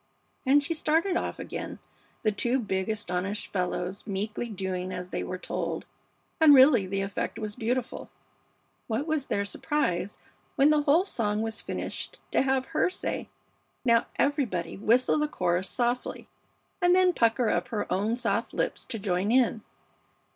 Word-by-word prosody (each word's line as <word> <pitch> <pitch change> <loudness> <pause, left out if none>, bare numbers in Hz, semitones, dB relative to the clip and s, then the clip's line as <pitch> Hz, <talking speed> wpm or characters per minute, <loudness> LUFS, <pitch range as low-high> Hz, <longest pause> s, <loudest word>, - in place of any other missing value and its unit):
And 285 +2 +5
she 310 - -1
started 325 +4 +1
off - - -2
again, - - -6 0.5
the 215 - +3
two 240 +5 +1
big 190 -5 -2
astonished 200 -1 -2
fellows 180 +1 -2
meekly 210 +4 -3
doing 185 -2 -3
as 180 0 -5
they - - -2
were 185 - -4
told, - - -3 0.5
and 310 -3 +8
really 260 -7 +6
the 195 +1 -1
effect 195 +2 -3
was 215 -2 -4
beautiful. 245 +1 -2 0.8
What 230 +5 -1
was 310 -4 -1
their 200 0 0
surprise 200 - -1 0.4
when 285 +1 +5
the 300 -1 +4
whole 300 +6 +4
song 215 - -1
was 225 0 -4
finished - - -5
to - - +3
have 265 -1 +1
her 315 - +3
say, 370 - -4 0.6
"Now 235 -1 +4
everybody 245 - 0
whistle 240 +8 +3
the 300 - +1
chorus 180 - 0
softly," 245 0 -2 0.5
and 355 0 +5
then 365 -1 +4
pucker 230 -2 +2
up - - 0
her 215 - -2
own 210 +4 +1
soft 245 - -1
lips - - -1
to 240 - -4
join 195 0 0
in. 240 -3 +3
225 Hz, 155 wpm, -28 LUFS, 195-275 Hz, 0.8 s, and